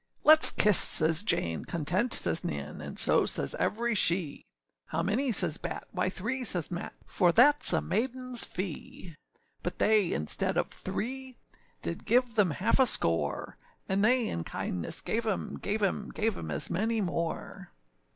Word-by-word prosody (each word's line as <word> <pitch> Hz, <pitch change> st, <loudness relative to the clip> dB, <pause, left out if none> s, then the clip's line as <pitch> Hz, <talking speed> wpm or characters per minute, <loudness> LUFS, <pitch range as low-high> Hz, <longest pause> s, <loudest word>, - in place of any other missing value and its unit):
âLetâs 310 Hz, +1 st, +7 dB
kiss,â 210 Hz, -, +3 dB
says 160 Hz, -2 st, +5 dB
Jane, 85 Hz, -, -2 dB
{165b} 165 Hz, -4 st, -5 dB
âContent,â 190 Hz, +10 st, +2 dB
says -, -, +4 dB
Nan, -, -, -7 dB
And -, -, -9 dB
so -, -, +1 dB
says -, -, +3 dB
every 235 Hz, +2 st, -2 dB
she; 170 Hz, -6 st, -1 dB, 0.4 s
âHow -, -, -3 dB
many?â 250 Hz, +6 st, -1 dB
says 170 Hz, -4 st, +3 dB
Batt; -, -, -7 dB
âWhy 185 Hz, 0 st, -2 dB
three,â 235 Hz, +8 st, -5 dB
says 175 Hz, -4 st, 0 dB
Matt, 175 Hz, -, -7 dB
âFor 180 Hz, -3 st, +1 dB
thatâs 295 Hz, -, +4 dB
a -, -, -1 dB
maidenâs 255 Hz, +2 st, +1 dB
fee.â 180 Hz, -1 st, -8 dB, 0.5 s
But -, -, -6 dB
they, 210 Hz, -5 st, +1 dB
instead 75 Hz, -, -2 dB
of -, -, -2 dB
three, 260 Hz, +2 st, -7 dB, 0.5 s
Did -, -, -6 dB
give 245 Hz, -1 st, 0 dB
them 210 Hz, -5 st, +1 dB
half 190 Hz, -, -1 dB
a 260 Hz, -, +4 dB
score, 80 Hz, -, 0 dB, 0.3 s
And 195 Hz, +1 st, -1 dB
they 245 Hz, +1 st, +2 dB
in 85 Hz, -, -5 dB
kindness 90 Hz, 0 st, -3 dB
gave 230 Hz, +1 st, -3 dB
âem, 215 Hz, -4 st, -5 dB
gave 210 Hz, +2 st, -3 dB
âem, 205 Hz, +1 st, -3 dB
Gave 220 Hz, 0 st, -1 dB
âem 80 Hz, -, -8 dB
as 70 Hz, -, +2 dB
many 220 Hz, +5 st, -2 dB
more. 170 Hz, -4 st, -5 dB
205 Hz, 165 wpm, -27 LUFS, 170-235 Hz, 0.5 s, âLetâs